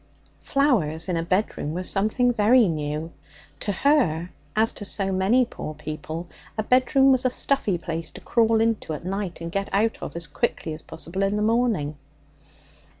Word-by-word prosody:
Flowers 190 - +1
in 180 - 0
a 165 - 0
bedroom 170 -3 -1
were 180 - -2
something 215 +6 +1
very 230 +1 +5
new. 155 0 -3 0.5
To 205 - -1
her, 185 - +2 0.2
as 220 +1 +2
to - - -4
so 195 -1 -1
many 195 +7 +3
poor 155 -9 -7
people, 155 +3 -6 0.3
a 215 - 0
bedroom 265 +3 +4
was 260 -1 +3
a 255 - +3
stuffy 245 -7 0
place 165 -1 -4
to - - -10
crawl 225 -1 +3
into 225 -8 0
at 155 - -7
night 190 -2 -3
and 165 0 -5
get 195 +2 -2
out 220 +3 +1
of - - -6
as 170 0 -3
quickly 150 +1 -2
as 155 - -5
possible 190 +4 -6
in 195 +1 +1
the 210 - 0
morning. 220 -10 +1
195 Hz, 175 wpm, -24 LUFS, 165-230 Hz, 0.5 s, very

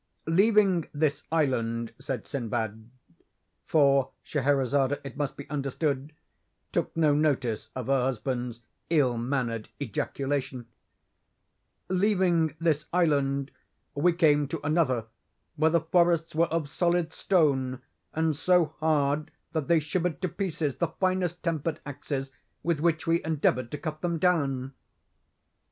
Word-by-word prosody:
"'Leaving 195 -1 +3
this 145 -1 +1
island,' 115 -7 0
said 130 - -4
Sinbad—(for 120 - -2
Scheherazade, 140 -1 +1
it 135 -3 -8
must 145 -2 -3
be 140 - -8
understood, 140 0 -2 0.6
took - - -2
no 155 -3 +4
notice 140 -7 0
of 130 -2 -4
her 135 0 +2
husband's 125 -1 -2 0.3
ill 140 -7 +3
mannered 120 -2 -2
ejaculation) 135 0 -3 1.2
'leaving 180 -5 +2
this 155 -3 +1
island, 140 -5 +1 0.4
we 165 +5 +3
came 150 -4 +3
to 160 +3 -4
another 145 -7 +1 0.5
where 160 +1 +3
the 170 +1 +3
forests 170 0 +2
were 165 +2 +3
of 160 -2 -1
solid 170 +2 0
stone, 135 -8 +1 0.3
and 160 -1 0
so 170 0 +3
hard 150 -1 +1 0.2
that 155 -4 -2
they 170 -1 +5
shivered 165 +2 -2
to 185 - -1
pieces 165 -5 -2
the 170 - +1
finest 180 +1 -1
tempered 165 -2 -1
axes 135 -1 -4 0.3
with 170 -3 0
which 165 0 +1
we 165 +1 +2
endeavoured 140 -6 +1
to 150 - -4
cut 155 0 -5
them 170 -1 0
down. 140 -7 +1
150 Hz, 125 wpm, -28 LUFS, 135-165 Hz, 1.2 s, they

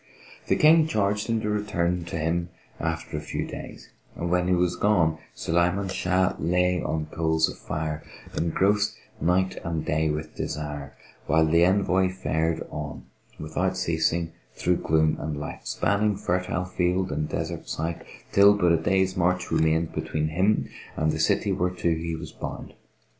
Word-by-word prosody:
The - - +3
King 155 +1 +6
charged 105 -4 0
him 115 -1 0
to 105 - -2
return 90 -4 0
to 85 - -4
him 85 +2 -1 0.3
after - - -3
a - - -3
few 75 - -3
days; - - -9 0.2
and, 85 0 -3
when 90 0 +2
he 90 - +3
was 90 0 +1
gone, 85 -6 +2 0.2
Sulayman 90 +3 +1
Shah 90 0 +1
lay 90 +1 +2
on 80 -1 -2
coals 80 -1 +2
of - - -8
fire, 75 0 -3 0.3
engrossed 100 +5 +1 0.3
night 95 +2 +1
and 80 -2 -2
day 80 +1 +1
with 75 +1 -3
desire; 75 -2 -5 0.3
while 80 0 +4
the 85 +2 +4
envoy 95 0 +3
fared 80 -3 -1
on 75 0 -6 0.4
without 90 +4 -1
ceasing 85 -1 0 0.2
through 90 -1 +1
gloom 80 0 +2
and 75 -1 -3
light, 75 - -7
spanning 105 +1 +1
fertile 90 -2 -1
field 90 +1 0
and 75 - -2
desert - - -4
site, 80 +1 -3 0.3
till 100 +1 +7
but 90 -4 +3
a 85 - +5
day's 95 +3 +1
march 90 +1 +1
remained 80 +1 +2
between 75 0 -1
him 95 +7 +2 0.3
and 80 0 +2
the - - -3
city - - +2
whereto 90 -1 0
he 80 0 -3
was 80 - -7
bound. - - -7
85 Hz, 160 wpm, -26 LUFS, 80-95 Hz, 0.4 s, till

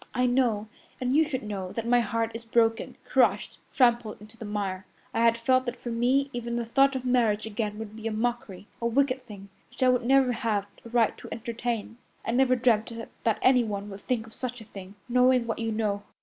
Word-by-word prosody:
I 250 - +2
know, 245 -4 +1 0.3
and 255 +1 0
you 315 0 +4
should 260 -6 -3
know, 195 -3 -5
that 230 - -3
my 245 +1 +4
heart 230 0 -1
is 230 +1 -7
broken, 225 0 +1
crushed, - - +1
trampled 240 -4 +2
into 215 +2 -15
the 230 - -8
mire. 195 -2 -3 0.3
I - - 0
had 230 0 +4
felt 255 +2 +2
that 245 - -2
for 240 - -5
me 260 +4 +1
even 235 -1 -3
the 240 -1 -1
thought 275 +4 +3
of 255 -1 -4
marriage 230 -4 +2
again 210 -1 -3
would 215 -1 -7
be 220 0 -5
a - - -2
mockery, 220 -4 -3 0.2
a 235 - +1
wicked 260 +1 +1
thing, 200 -2 -11 0.2
which - - -4
I 255 - +5
would 250 -1 +2
never 265 +1 +4
have 220 -4 -1 0.2
a 230 - -10
right 235 -1 +2
to - - -10
entertain. 235 0 -4 0.3
I - - -1
never 255 +1 +3
dreamt 235 -2 +2 0.3
that 225 -2 +1
anyone 215 -6 +2
would 195 +1 -9
think 240 -4 -1
of 225 - -15
such 245 0 -5
a 220 - -11
thing, 195 -1 -11
knowing 250 0 +4
what 230 -1 -3
you 225 -1 -1
know. 210 -2 -1
230 Hz, 220 wpm, -27 LUFS, 215-250 Hz, 0.3 s, I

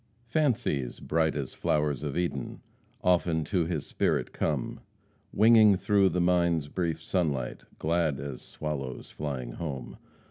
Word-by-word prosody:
"Fancies, 120 - 0
bright 80 -1 +1
as 70 -3 -4
flowers 75 -3 0
of 75 -1 -3
Eden, 85 -8 -2 0.4
Often 85 -3 +2
to 85 +1 0
his 80 -5 -2
spirit - - 0
come, - - -2 0.5
Winging 110 -1 +6
through 100 0 +3
the 90 - -1
mind's 85 -4 +2
brief 85 -2 -1
sunlight, 75 -10 -2
Glad 80 -3 +1
as 70 -2 -6
swallows 70 -4 -5
flying 65 -5 -4
home. 70 -2 -6
80 Hz, 130 wpm, -28 LUFS, 70-90 Hz, 0.5 s, Winging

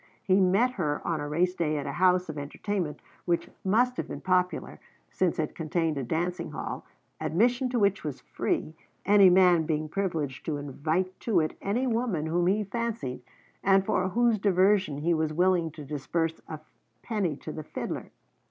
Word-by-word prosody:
He 190 +1 +3
met 195 +7 +3
her 150 -10 -1
on 160 -3 0
a 145 - -4
race 175 +4 +1
day 155 -4 -1
at 145 - -3
a 140 - -3
house 180 +3 +3
of 155 - -6
entertainment 165 +3 -4 0.2
which 170 -1 0
must 245 +6 +2
have - - -3
been - - -6
popular, 180 -1 0 0.3
since 180 -3 0
it 155 -2 -2
contained 160 0 -1
a 140 - -2
dancing 170 +5 -2
hall, - - -5 0.3
admission 245 +8 +1
to 245 - -1
which 200 -2 +2
was 150 -4 -4
free, 155 - -2 0.3
any 200 -1 +7
man 180 -3 +5
being 155 -1 -1
privileged 155 -7 -2
to 155 -2 -1
invite 155 +6 -2
to 215 -7 +2
it 155 -1 -1
any 225 +7 0
woman 225 -10 0
whom 175 +2 +1
he 205 +3 +2
fancied 205 - -3 0.4
and 195 0 +4
for 185 0 +1
whose 230 +2 +2
diversion 190 -4 +3
he 165 +4 +1
was 160 -1 0
willing 175 0 +2
to 150 -1 -10
disburse 160 +3 -2
a 155 -1 -7 0.4
penny 200 - -1
to 155 - -8
the 155 - -6
fiddler. - - -5
180 Hz, 180 wpm, -28 LUFS, 155-200 Hz, 0.4 s, any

